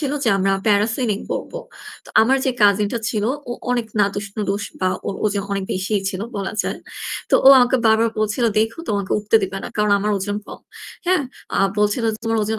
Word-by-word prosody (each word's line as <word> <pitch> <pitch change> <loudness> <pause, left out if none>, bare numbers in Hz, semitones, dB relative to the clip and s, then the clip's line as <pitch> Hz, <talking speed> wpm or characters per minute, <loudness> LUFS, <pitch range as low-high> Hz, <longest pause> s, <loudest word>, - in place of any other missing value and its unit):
ছিল 285 -2 -2
যে - - +2
আমরা 195 0 +1
প্যারাসিলিং 215 +1 +1
করব। - - -4 0.5
তো - - -16
আমার 260 +4 +3
যে 265 - +2
কাজিনটা 205 +2 +3
ছিল 210 -3 -1 0.3
ও - - 0 0.2
অনেক 240 -2 0
নাদুস-নুদুস 200 0 -1 0.2
বা 185 - +2 0.2
ওর 195 - -2
ওজন 205 -1 0
অনেক 195 -1 -2
বেশিই 195 +2 -1
ছিল 185 -1 -5 0.2
বলা 195 0 -3
যায়। - - -4 0.5
তো - - +4
ও - - +12
আমাকে 250 +1 +4
বারবার 220 +1 +4
বলছিল, 215 +3 0
"দেইখো 225 +6 0
তোমাকে 200 -2 -1
উঠতে 210 +2 +3
দিবে 195 0 -3
না।" - - -5
কারণ 210 -1 +2
আমার 210 +1 -1
ওজন 205 +2 -3
কম। - - -10 0.5
হ্যাঁ? 365 -4 +3 0.3
আ - - +1 0.2
বলছিল, 210 +3 +1 0.2
"তোমার 225 0 0
ওজন 220 +1 -2
210 Hz, 190 wpm, -20 LUFS, 200-225 Hz, 0.5 s, ও